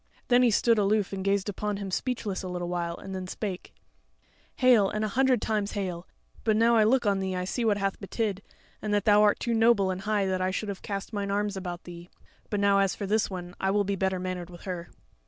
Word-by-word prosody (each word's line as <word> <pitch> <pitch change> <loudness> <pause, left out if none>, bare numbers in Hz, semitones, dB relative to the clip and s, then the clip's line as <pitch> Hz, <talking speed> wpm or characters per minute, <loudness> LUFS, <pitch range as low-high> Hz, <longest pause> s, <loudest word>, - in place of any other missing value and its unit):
Then 245 0 +5
he 245 - +5
stood 230 +1 +3
aloof 205 -1 +1
and 190 -1 -3
gazed 200 0 +1
upon 205 0 -2
him 195 -1 -5
speechless 220 -3 -2
a 185 - -5
little 175 -1 -4
while, 170 -1 -2
and 195 - -8
then 185 -1 -5
spake: 185 -1 -5 0.8
"Hail, 240 -6 +5
and 215 +1 -1
a - - -2
hundred 255 +1 +2
times 210 -2 -1
hail! 185 -3 -4 0.4
but 220 -1 +2
now 230 +1 +4
I 220 - +5
look 240 +2 +3
on 200 -1 +2
thee 190 -1 -2
I 180 0 -2
see 235 +6 -2
what 215 -3 +2
hath 195 -1 -2
betid, 200 -1 -2 0.4
and 210 -1 0
that 205 0 0
thou 210 -1 +6
art 210 -1 +4
too 235 - -1
noble 225 -4 +4
and 185 0 -4
high 210 -1 0
that 185 -1 -1
I 185 - +1
should 205 +3 -3
have 195 - -5
cast 200 +1 -5
mine 200 -1 -2
arms 205 0 -1
about 175 -2 -5
thee. 175 0 -10 0.4
But 205 - -1
now 200 0 +4
as 195 -1 +2
for 205 - -4
this 215 +2 +1
one, 180 -2 -6
I 190 - +1
will 205 +1 +2
be 200 0 -1
better 190 0 0
mannered 180 -1 -4
with 175 -1 -12
her." 175 -3 -5
200 Hz, 245 wpm, -27 LUFS, 185-215 Hz, 0.8 s, thou